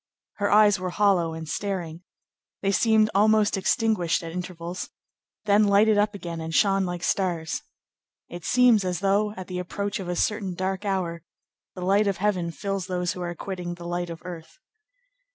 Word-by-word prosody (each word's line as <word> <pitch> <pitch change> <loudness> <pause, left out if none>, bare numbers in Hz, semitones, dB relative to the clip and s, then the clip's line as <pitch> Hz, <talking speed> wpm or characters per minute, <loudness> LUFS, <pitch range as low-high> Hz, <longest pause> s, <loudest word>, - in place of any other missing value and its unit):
Her 205 -1 0
eyes 205 -1 +5
were 185 0 -3
hollow 180 -4 +2
and 160 -1 -7
staring. 175 -1 -4 0.6
They 195 - +2
seemed 220 +1 +3
almost 215 +1 +4
extinguished 195 -4 +1
at 165 - -6
intervals, 175 0 -6 0.6
then 210 +1 +4
lighted 205 +2 +4
up 210 0 +1
again 170 -4 -6
and 160 0 -4
shone 195 -2 +3
like 175 0 -5
stars. 170 -5 -1 0.7
It 175 -1 -9
seems 245 -3 +4
as 180 -1 -2
though, 200 +2 +2
at 185 - -6
the 180 0 -5
approach 200 +3 -3
of 185 -2 -5
a 175 - -1
certain 200 -2 -1
dark 190 +2 -3
hour, 180 -4 -2 0.5
the 180 -1 -5
light 200 +2 +3
of 195 - 0
heaven 185 -3 0
fills 195 +1 -4
those 180 -1 -1
who 180 - -7
are 175 -1 -4
quitting 180 -1 -5
the 175 0 -10
light 175 0 -3
of 165 -1 -8
earth. 170 - -9
185 Hz, 175 wpm, -25 LUFS, 175-205 Hz, 0.7 s, eyes